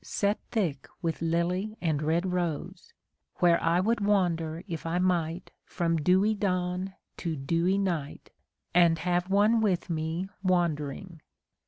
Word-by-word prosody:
Set 205 Hz, +1 st, 0 dB
thick 170 Hz, -, -1 dB, 0.2 s
with 165 Hz, -1 st, -2 dB
lily 180 Hz, +6 st, -1 dB
and 155 Hz, -6 st, 0 dB
red 165 Hz, +4 st, +1 dB
rose. 180 Hz, -, -3 dB, 0.4 s
Where 170 Hz, -1 st, +3 dB
I 170 Hz, +1 st, +2 dB
would 225 Hz, +5 st, +1 dB
wander 170 Hz, -5 st, +1 dB
if 165 Hz, -4 st, -5 dB
I 165 Hz, +1 st, -1 dB
might 175 Hz, -2 st, 0 dB
From 170 Hz, -2 st, -1 dB
dewy 185 Hz, +7 st, +3 dB
dawn 185 Hz, -2 st, -1 dB, 0.2 s
to 165 Hz, -3 st, -3 dB
dewy 165 Hz, +7 st, +1 dB
night. 170 Hz, -8 st, -3 dB, 0.4 s
And 170 Hz, -1 st, +5 dB
have 175 Hz, +2 st, 0 dB
one 210 Hz, +3 st, +4 dB
with 190 Hz, -3 st, 0 dB
me 160 Hz, +3 st, -2 dB
wandering. 170 Hz, -2 st, -1 dB
175 Hz, 135 wpm, -28 LUFS, 165-190 Hz, 0.4 s, And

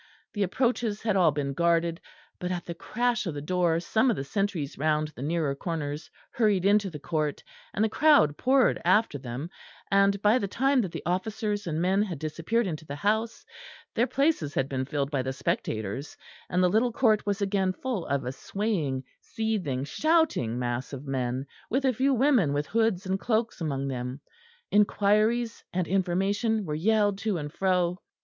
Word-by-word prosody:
The 205 Hz, -, -3 dB
approaches 230 Hz, +1 st, 0 dB
had 215 Hz, -3 st, +1 dB
all 180 Hz, -4 st, +5 dB
been 140 Hz, -2 st, -2 dB
guarded, 170 Hz, +2 st, +1 dB, 0.4 s
but 180 Hz, 0 st, -3 dB
at 175 Hz, -1 st, -3 dB
the 170 Hz, -, -5 dB
crash 240 Hz, +5 st, -1 dB
of 160 Hz, -, -3 dB
the -, -, -3 dB
door 170 Hz, +1 st, +1 dB
some 220 Hz, +9 st, +2 dB
of 230 Hz, -, +2 dB
the 135 Hz, -, -3 dB
sentries 165 Hz, -1 st, -2 dB
round 155 Hz, +1 st, 0 dB
the 145 Hz, -, -11 dB
nearer 155 Hz, -1 st, 0 dB
corners 150 Hz, 0 st, -4 dB, 0.2 s
hurried 210 Hz, -5 st, +2 dB
into 205 Hz, 0 st, +4 dB
the 160 Hz, -, -7 dB
court, 150 Hz, 0 st, -2 dB, 0.3 s
and 215 Hz, -, +1 dB
the -, -, +3 dB
crowd 280 Hz, -, +4 dB
poured 260 Hz, -, +3 dB
after 185 Hz, -4 st, +3 dB
them; 130 Hz, +6 st, -6 dB, 0.4 s
and 200 Hz, 0 st, +4 dB
by 215 Hz, +4 st, +5 dB
the 200 Hz, -, -2 dB
time 265 Hz, +5 st, +2 dB
that 190 Hz, -6 st, -3 dB
the -, -, -6 dB
officers 205 Hz, +3 st, -2 dB
and 160 Hz, -1 st, -1 dB
men 190 Hz, +2 st, +3 dB
had 190 Hz, -6 st, -2 dB
disappeared 165 Hz, +10 st, -1 dB
into 160 Hz, -4 st, -4 dB
the 145 Hz, -2 st, -7 dB
house, 220 Hz, +7 st, -1 dB, 0.5 s
their 240 Hz, -, +2 dB
places 275 Hz, -, 0 dB
had 135 Hz, -, +1 dB
been 130 Hz, -1 st, -2 dB
filled 140 Hz, 0 st, -2 dB
by 140 Hz, -3 st, 0 dB
the 130 Hz, +1 st, -2 dB
spectators, 130 Hz, -1 st, -3 dB, 0.3 s
and 180 Hz, +1 st, +2 dB
the -, -, +5 dB
little 225 Hz, +6 st, +2 dB
court 220 Hz, -4 st, +2 dB
was 200 Hz, 0 st, 0 dB
again 195 Hz, -2 st, +1 dB
full 225 Hz, -1 st, -4 dB
of 140 Hz, -2 st, -1 dB
a 125 Hz, -, -2 dB
swaying, 155 Hz, -5 st, -2 dB, 0.2 s
seething, 200 Hz, -, -2 dB
shouting 310 Hz, -, +1 dB
mass 120 Hz, +2 st, -3 dB
of 135 Hz, +1 st, -7 dB
men, 130 Hz, -1 st, -2 dB, 0.2 s
with 265 Hz, +4 st, 0 dB
a 260 Hz, -, +3 dB
few 265 Hz, +4 st, +2 dB
women 250 Hz, -, +3 dB
with 145 Hz, +1 st, 0 dB
hoods 220 Hz, -3 st, +1 dB
and 190 Hz, +1 st, -1 dB
cloaks 225 Hz, -2 st, -1 dB
among 140 Hz, -4 st, -2 dB
them 125 Hz, 0 st, -4 dB, 0.5 s
inquiries 215 Hz, +3 st, +2 dB
and 180 Hz, -2 st, -1 dB
information 195 Hz, +4 st, 0 dB
were 150 Hz, -, -3 dB
yelled 205 Hz, +4 st, +2 dB
to 205 Hz, -2 st, -1 dB
and 145 Hz, -2 st, -5 dB
fro. 180 Hz, -2 st, +1 dB
185 Hz, 185 wpm, -27 LUFS, 150-220 Hz, 0.5 s, all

